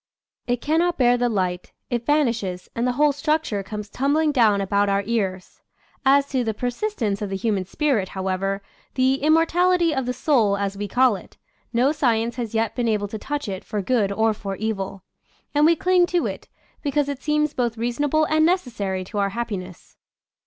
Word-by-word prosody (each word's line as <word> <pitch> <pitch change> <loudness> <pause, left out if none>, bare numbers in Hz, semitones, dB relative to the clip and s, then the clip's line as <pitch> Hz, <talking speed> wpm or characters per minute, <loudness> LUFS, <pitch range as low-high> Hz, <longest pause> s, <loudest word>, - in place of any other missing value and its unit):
It 245 -1 0
cannot 335 +3 +1
bear 245 -2 +4
the 245 0 +1
light 185 -4 -2
— - - -54
it 240 -1 -2
vanishes, 230 -12 0
and 235 +2 0
the 250 - +1
whole 295 +3 +3
structure 290 -7 -1
comes 210 +1 -6
tumbling 295 +7 +1
down 225 -7 +4
about 200 +1 +1
our 200 0 +1
ears. 195 -5 -3 0.4
As 275 +1 +4
to 260 -2 0
the 220 -2 -2
persistence 245 - -2
of 205 - -3
the 195 - -3
human 195 -1 -1
spirit, 220 -3 0
however 195 +1 -2
— - - -31
" - - -39
the 260 +1 +2
immortality 335 +2 +3
of 265 -3 -2
the - - +1
soul," 230 -9 +2
as 200 0 -2
we 205 +1 -4
call 250 +2 +3
it 190 - -12 0.2
— - - -42
no 250 +4 +3
science 235 -5 0
has 230 -2 -4
yet 225 0 +1
been 245 -2 0
able 210 -2 0
to 220 - -6
touch 290 +2 -4
it 190 -2 -5
for 210 -2 -3
good 215 -3 +1
or 220 +2 +2
for 200 -2 -5
evil; 195 -2 -4 0.5
and 295 +1 +5
we 335 - +5
cling 360 +1 +3
to 350 -1 0
it, - - -5 0.3
because 290 0 0
it 280 -1 -4
seems 300 0 +1
both 240 -2 -1
reasonable 285 +7 +1
and 310 +1 +2
necessary 230 - 0
to 205 +3 -5
our 200 0 +1
happiness. 195 -5 -6
235 Hz, 200 wpm, -23 LUFS, 200-290 Hz, 0.5 s, and